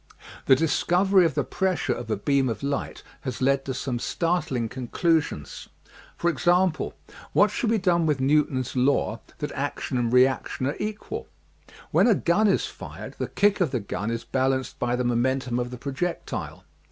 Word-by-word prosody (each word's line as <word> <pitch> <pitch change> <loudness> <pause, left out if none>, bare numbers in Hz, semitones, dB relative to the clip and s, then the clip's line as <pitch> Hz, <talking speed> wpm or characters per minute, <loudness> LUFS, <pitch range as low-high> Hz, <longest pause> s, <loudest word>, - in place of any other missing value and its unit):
The 135 - +8
discovery 180 +5 +3
of 165 - 0
the - - +1
pressure 190 -2 0
of 120 -2 -7
a 110 - 0
beam 135 +4 +1
of 110 +1 -4
light 140 0 -3 0.2
has 130 -3 -5
led 135 +1 +2
to 130 - -2
some 125 -2 -2
startling 165 -7 -1
conclusions. 130 - -1 0.5
For 170 - -1
example, 175 +3 +1 0.4
what - - +5
shall 235 - -1
be 225 - +3
done 175 -4 +2
with 150 -3 +1
Newton's 135 -2 +1
law 130 +2 +1 0.2
that - - -4
action 125 - -2
and 120 -1 0
reaction 130 +1 +2
are 140 - -1
equal? 210 0 -4 0.6
When - - +4
a 225 - +5
gun 195 +6 +2
is 195 - +2
fired - - -9
the - - -1
kick 205 -1 +2
of 175 - +3
the 130 - -1
gun 100 0 -4
is 115 0 -3
balanced 130 0 -1
by 120 0 0
the 125 - -1
momentum 125 +1 0
of 120 0 -2
the 125 - -7
projec 140 +7 -3
tile. - - -6
135 Hz, 175 wpm, -25 LUFS, 125-175 Hz, 0.6 s, The